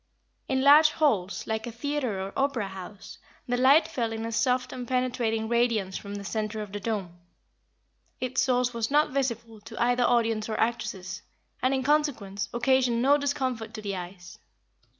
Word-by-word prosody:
In 265 -1 0
large 300 +3 +8
halls, 210 - +1
like 220 +1 -3
a - - -5
theatre 255 -3 -2
or 195 +1 -5
opera 265 -7 0
house, 190 +1 -10 0.3
the 245 - 0
light 265 +6 +5
fell 230 -3 -2
in 225 0 -4
a 230 - -4
soft 250 +2 0
and 250 -1 -6
penetrating 245 -3 0
radiance 230 -5 +1
from 200 0 -6
the 200 - -6
center 215 +1 -3
of 205 - -10
the 205 - -4
dome. 195 -5 -4 1.0
Its 255 0 0
source 250 -1 +1
was 230 -1 -2
not 295 +2 +3
visible 235 -5 -3
to 225 +2 -10
either 245 +1 +2
audience 225 -3 +1
or 215 - -2
actresses, 210 -4 -2 0.4
and, 255 - +2
in 265 -1 0
consequence, 250 -9 0
occasioned 245 -1 +2
no 280 +2 +6
discomfort 255 -6 -2
to 215 - -6
the 200 -1 -3
eyes. 175 -1 -9
235 Hz, 170 wpm, -27 LUFS, 210-255 Hz, 1.0 s, large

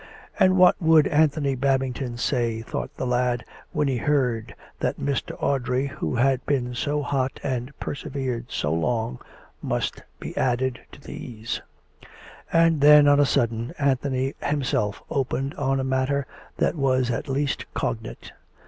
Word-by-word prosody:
And 185 0 +5
what 180 +1 +5
would 160 -2 +6
Anthony 150 -2 +2
Babing 135 0 +1
ton 120 -2 -5
say, 115 -2 0
thought - - -4
the - - -2
lad, 125 0 0 0.3
when 150 -1 0
he 130 -2 0
heard 125 -4 0 0.2
that - - -1
Mr. 140 -1 -2
Audrey, 130 -1 0
who 140 -2 -3
had 130 +1 +2
been 125 -3 0
so 145 +4 -1
hot 135 -2 -1
and 130 -1 -2
persevered 130 -4 -4
so 75 +1 -1
long, 115 +7 -1 0.4
must - - -2 0.2
be - - -7
added 125 0 0
to - - -13
these? 115 -4 -6 0.9
And 165 -2 +4
then, 150 0 +8
on 145 0 +6
a 145 - +5
sudden, 115 +5 0
Anthony 135 -1 0
himself 135 -8 -1
opened 135 0 -1
on 135 -1 0
a - - -1
matter 130 +1 0 0.3
that - - +2
was 130 -4 +1
at 130 +5 -3
least 140 +1 -2
cognate. - - -4
130 Hz, 150 wpm, -24 LUFS, 125-145 Hz, 0.9 s, then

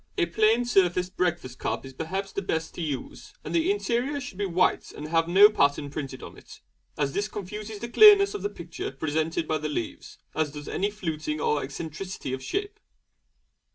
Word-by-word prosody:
A - - +3
plain 220 +7 +3
surfaced 185 -4 +2
breakfast 175 -8 -1
cup - - -2
is 135 - -10
perhaps 190 +7 -4
the 200 - -3
best 160 -4 -2
to - - -6
use; 145 -5 -5
and - - -6
the 335 +2 +2
interior 285 -8 0
should 210 -7 -8
be 200 - 0
white 180 0 +1
and 150 - -7
have 165 0 +2
no 195 +4 +8
pattern 145 -8 +1
printed 135 -3 -6
upon - - -10
it, - - -14 0.4
as 140 -2 0
this 205 +1 0
confuses 210 +1 -6
the 235 - -5
clearness 405 - +8
of - - -4
the 205 - -1
picture 170 -5 -6
presented 160 +4 -1
by 155 - 0
the 150 +1 -3
leaves, 130 -6 -5 0.2
as 155 -1 0
does 150 -1 -8
any 200 +2 0
fluting 155 -7 -3
or 150 0 +1
eccentricity 155 +1 -6
of 130 - -4
shape. 405 +2 -3
175 Hz, 190 wpm, -27 LUFS, 150-210 Hz, 0.4 s, no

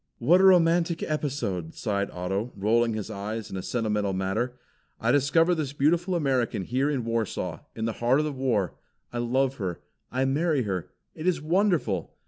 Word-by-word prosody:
"What 170 +10 +4
a - - +6
romantic 170 -2 +4
episode!" 125 - -2
sighed 100 -2 -1
Otto, 95 +6 -3
rolling 115 +3 +2
his 110 0 -4
eyes 105 +2 -5
in - - -5
a - - -3
sentimental 105 -3 -1
manner. 100 +7 -1 0.4
"I - - +2
discover 165 +5 +4
this 150 -5 -2
beautiful 170 +6 +2
American 130 - 0
here 130 +7 0
in 135 -6 -1
Warsaw, 110 -7 -2 0.2
in 110 - -2
the 115 - -1
heart 120 +4 +2
of 150 - +1
the 150 - -1
war; 125 -8 0 0.4
I 120 - -2
love 130 +3 +1
her; 90 -5 -3 0.3
I 130 +1 +1
marry 145 0 +1
her. 95 -5 -3 0.2
It 155 - -5
is 180 - +2
wonderful!" 160 - 0
125 Hz, 175 wpm, -27 LUFS, 105-150 Hz, 0.4 s, a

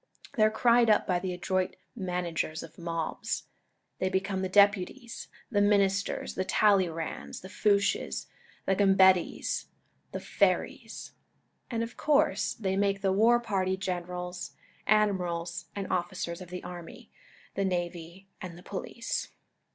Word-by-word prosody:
They 225 - 0
are 215 - +7
cried 235 +1 +4
up 215 - +4
by 180 -2 +1
the 185 0 -3
adroit 185 +1 -1 0.2
managers 175 -5 -2
of - - -12
mobs. 165 -1 -3 0.6
They 185 - +1
become 190 0 -1
the 190 - -1
deputies, 205 +5 +2 0.2
the 205 -3 +3
ministers, 200 -1 +2
the 185 - -1
Talleyrands, 185 -5 +1
the 185 - -10
Fouches, 200 - +1 0.4
the 195 - +2
Gambettas, 190 -2 +3 0.5
the - - -3
Ferrys; - - -1 0.6
and 230 -2 -1
of 230 +1 -7
coui'se 285 -9 +2
they 190 -3 -1
make 195 0 +1
the 190 -1 +3
war 230 +4 +5
party 190 -5 0
generals, 180 -1 -4 0.3
admirals, 180 -5 +1
and 200 -1 -3
officers 175 0 -2
of 180 - -9
the 180 0 -6
army, 175 -2 -9 0.4
the 195 - -1
navy, 175 0 -3
and 175 -2 -7
the 175 - -13
police. 215 +5 -4
190 Hz, 135 wpm, -29 LUFS, 180-205 Hz, 0.6 s, are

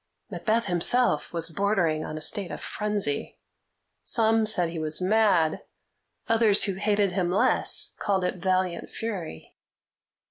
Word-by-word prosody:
Macbeth 230 +1 -1
himself 180 0 +1
was 165 -1 0
bordering 170 -4 0
on 155 - -6
a - - -7
state 190 +4 +1
of - - -7
frenzy. 210 -9 -3 0.6
Some 225 -1 +2
said 180 -6 +2
he 165 - -5
was 155 0 -2
mad; 185 -5 +2 0.7
others, 225 -3 +4
who 200 - 0
hated 205 0 0
him 180 -1 -1
less, 185 - +2
called 195 -3 -1
it 180 - -2
valiant 185 -1 -1
fury. 190 - -7
190 Hz, 135 wpm, -25 LUFS, 170-215 Hz, 0.7 s, others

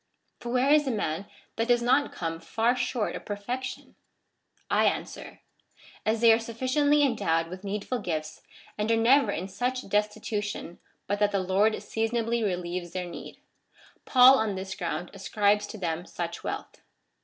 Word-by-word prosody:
For 240 - -6
where 255 +3 +3
is 300 -1 +4
the - - -1
man 200 -5 -2 0.3
that 225 +1 0
does 240 -1 +3
not 260 +4 +3
come 165 -1 -4
far 230 +7 +1
short 245 -3 -1
of - - -7
perfection? 245 +6 -5 0.7
I - - +3
answer, - - -3 0.3
" - - -23
As 220 +1 +1
they 230 -1 +8
are 225 - +3
sufficiently 260 +6 +2
endowed 195 -11 +1
with 185 +2 -8
needful 205 +5 -3
gifts, 155 -4 -4 0.4
and 210 +2 +1
are - - +5
never 235 0 +4
in 185 0 -3
such 250 +7 -3
destitution 210 -3 -2 0.3
but 205 +1 -1
that 205 -1 +3
the 200 - +1
Lord 195 +4 +2
seasonably 230 +1 -1
relieves 175 -3 -3
their 185 -1 -3
need; 175 - -9 0.7
Paul 260 +1 +7
on 215 -3 0
this 190 +1 -5
ground 175 -2 -4
ascribes 205 +1 +1
to 215 - -8
them 170 -2 -3
such 170 -1 -5
wealth." - - -6
210 Hz, 165 wpm, -27 LUFS, 185-240 Hz, 0.7 s, they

